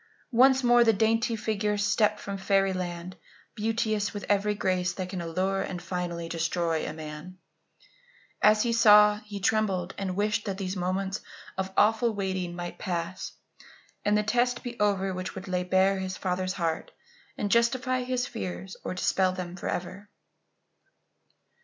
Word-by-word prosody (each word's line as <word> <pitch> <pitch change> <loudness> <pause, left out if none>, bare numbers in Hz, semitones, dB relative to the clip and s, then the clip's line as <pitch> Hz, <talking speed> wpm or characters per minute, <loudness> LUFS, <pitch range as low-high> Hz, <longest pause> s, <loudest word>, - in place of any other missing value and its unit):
Once 260 +2 +5
more 240 0 +6
the 225 - +5
dainty 225 +2 +2
figure 210 -1 -1
stepped 210 +1 +2
from 200 - -5
fairy 195 0 +2
land, 180 0 -5 0.4
beauteous 215 -2 -1
with 205 - -5
every 205 +1 +2
grace 180 -2 0
that 185 0 -5
can 185 -2 -4
allure 185 +3 -1
and 185 -2 -4
finally 175 -2 -4
destroy 165 -1 -1
a - - -3
man. 155 +3 -8 1.0
And 210 - +7
as 215 0 +2
he 235 -1 0
saw, 210 -2 +7
he 210 -1 -8
trembled 195 -3 0
and 190 -2 -2
wished 210 +1 0
that 195 -2 -3
these 190 -1 -3
moments 190 +2 -2 0.3
of 190 0 -3
awful 220 +1 +3
waiting 185 -3 -2
might 175 0 -6
pass 175 -1 -4 0.7
and 210 0 +3
the 210 - +2
test 240 +3 +1
be 245 -1 -5
over 195 -2 +1
which 185 0 -5
would 190 0 -7
lay 180 -1 0
bare 190 +2 +2
his 190 0 -4
father's 185 0 -1
heart 165 -4 -2 0.5
and 205 -1 -2
justify 255 +2 +2
his 250 0 -1
fears 190 -5 -6
or - - -4
dispel 185 0 +2
them 180 -1 -6
forever. 185 +3 -5
195 Hz, 160 wpm, -28 LUFS, 185-215 Hz, 1.0 s, And